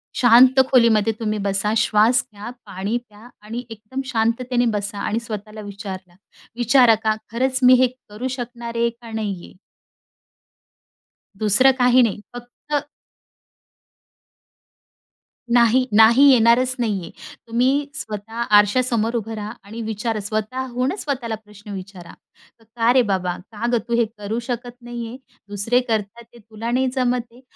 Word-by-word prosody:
शांत 255 +2 +6
खोलीमध्ये 225 -4 +4
तुम्ही 215 -2 -2
बसा, 200 +2 -1
श्वास 225 +2 +3
घ्या, 205 +3 -8 0.2
पाणी 200 +6 -3
प्या 210 +3 -16 0.2
आणि 230 +3 -5
एकदम 225 +4 -7
शांततेने 240 0 0
बसा 205 0 -4
आणि 215 +2 -1
स्वतःला 215 -2 -8
विचारला 190 -3 -8 0.4
विचारा 240 -1 +5
का 215 -1 +2 0.2
खरंच 260 +3 0
मी 250 +1 +8
हे 255 - +5 0.2
करू 215 +5 -5
शकणार 235 -1 -7
आहे 235 0 +2
का 235 -1 -13
नाहीये? 205 -5 -5 1.9
दुसरं 215 +6 +4
काही 250 0 +5
नाही. 215 -3 0
फक्त 285 +4 -5 2.7
नाही, 240 +2 +4
नाही 230 +5 +7
येणारच 250 +1 +4
नाहीये. 205 -7 -2 0.4
तुम्ही 260 +5 +1
स्वतः 225 -3 -6 0.2
आरशासमोर 230 +2 +1
उभं 225 -1 -4
राहा 210 0 -6
आणि 220 +3 -8
विचार 220 +1 -3
स्वतःहूनच 250 - -3
स्वतःला 250 -6 -3
प्रश्न 210 -1 -13
विचारा. 185 -2 -9 0.5
"का 230 +1 +1
रे 255 0 +5
बाबा? 180 -2 -1 0.2
का 220 +2 -3
गं 240 - +3
तू? 235 - 0
हे 235 0 +3
करू 210 +2 -3
शकत 245 0 -4
नाहीये. 240 0 -7 0.3
दुसरे 205 +5 +1
करतात 220 +1 -3
ते 240 - -15
तुला 225 +1 -7
नाही 260 +2 +1
जमत 245 -2 -1
आहे." 245 - -17
230 Hz, 135 wpm, -21 LUFS, 210-245 Hz, 2.7 s, मी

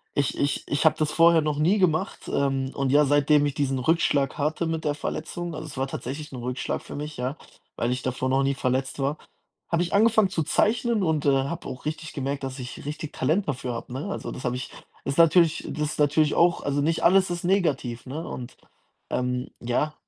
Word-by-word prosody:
ich 145 -1 0
ich 140 0 0
ich 145 +3 0
habe 160 - +6
das 150 -1 +1
vorher 165 0 +6
noch 150 -1 -1
nie 190 +7 +3
gemacht, 160 -4 0
ähm, 135 -1 +1
und 135 -1 0
ja, 150 +1 +5
seitdem 145 +1 +4
ich 145 - -4
diesen 135 -3 0
Rückschlag 145 -1 +1
hatte 155 +3 0
mit 160 -1 -2
der 145 - +2
Verletzung 165 +3 -4
also, 155 +1 -6
es 145 - -10
war 135 +1 0
tatsächlich 140 +4 -6
'n 130 - -5
Rückschlag 125 +1 -3
für - - -9
mich, 150 +1 -5
ja, 130 +4 -3 0.4
weil 120 - 0
ich 125 0 -2
davor 130 0 -1
noch 135 +1 +2
nie 140 +1 +2
verletzt 130 +1 -1
war, 140 +3 0 0.5
habe 170 0 +1
ich 175 - -5
angefangen 220 -2 +4
zu 165 -4 -1
zeichnen 225 - +1
und, 155 -3 0
äh, 135 -1 +3
habe 170 +4 -5
auch 130 +2 -8
richtig 155 +1 -4
gemerkt, 140 0 -3
dass 135 0 -5
ich 125 +2 -8
richtig 150 +1 -5
Talent 165 +9 0
dafür 125 -3 -2
habe, 115 - -7
ne? 145 +9 -4
Also, - - -5
das 130 - -7
habe 125 - 0
ich 125 - -6 0.4
ist 140 +2 -2
natürlich 165 0 +5
das 150 0 -2
ist - - -9
natürlich 150 +1 +3
auch 175 0 +4
also 140 0 0
nicht 165 +3 0
alles 185 +1 +5
ist 175 0 -3
negativ, 145 -11 0
ne? 155 +5 -5
Und, 125 0 -7 0.6
ähm, 125 0 -1
ja. 125 +6 0
145 Hz, 220 wpm, -25 LUFS, 135-160 Hz, 0.6 s, habe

